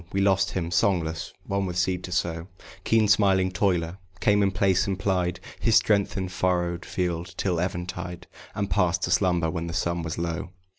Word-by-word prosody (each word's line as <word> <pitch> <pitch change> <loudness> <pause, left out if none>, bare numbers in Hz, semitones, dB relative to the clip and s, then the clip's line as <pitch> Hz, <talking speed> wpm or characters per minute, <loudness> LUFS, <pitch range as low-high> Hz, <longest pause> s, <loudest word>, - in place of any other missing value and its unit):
We 100 - 0
lost 95 -1 +3
him. 85 -3 -2
Songless, 85 -4 0
one 100 0 -1
with 90 -1 -4
seed 90 0 0
to 90 - -8
sow, 85 -1 -1 0.4
Keen 110 -1 +3
smiling 95 -2 +3
toiler, 90 -2 0 0.2
came 105 +2 +3
in 100 - +3
place, 95 +1 +2
and 95 -2 -1
plied 90 -2 0 0.2
His 115 -2 +3
strength 100 -3 +3
in 95 -1 -1
furrowed 90 -1 -1
field 90 -1 -3
till 90 -4 0
eventide, 90 0 -4 0.3
And 100 -1 -1
passed 90 -3 +1
to - - 0
slumber 90 -4 +2
when 85 +1 -3
the 85 - -5
sun 85 0 -1
was 80 -1 -4
low. 85 +1 -3
90 Hz, 185 wpm, -26 LUFS, 85-95 Hz, 0.4 s, lost